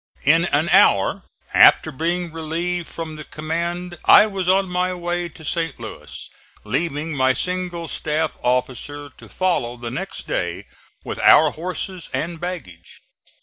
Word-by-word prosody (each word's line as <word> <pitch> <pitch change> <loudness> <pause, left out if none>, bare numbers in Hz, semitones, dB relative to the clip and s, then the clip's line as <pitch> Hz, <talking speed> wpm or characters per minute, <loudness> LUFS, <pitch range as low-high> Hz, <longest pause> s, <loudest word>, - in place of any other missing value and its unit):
In - - +4
an - - +1
hour - - +4 0.3
after - - +6
being 170 +4 -2
relieved 165 +2 -3
from 160 -2 -7
the 155 - -7
command 170 +3 -4
I 210 - +8
was 195 -4 -2
on 190 +1 +3
my 180 0 -1
way 175 0 -3
to 160 0 -14
St. 165 +2 -2
Louis, - - -8 0.4
leaving 160 -1 -2
my 130 -1 +3
single 180 0 -3
staff 155 0 -1
officer(*6) 130 +3 -2
to - - -14
follow 150 -10 -1
the 120 -1 -6
next 130 - -5
day - - -2 0.4
with - - -5
our 155 -1 +6
horses 180 +1 -6
and 165 +1 -3
baggage. 150 - -7
165 Hz, 145 wpm, -21 LUFS, 150-180 Hz, 0.4 s, I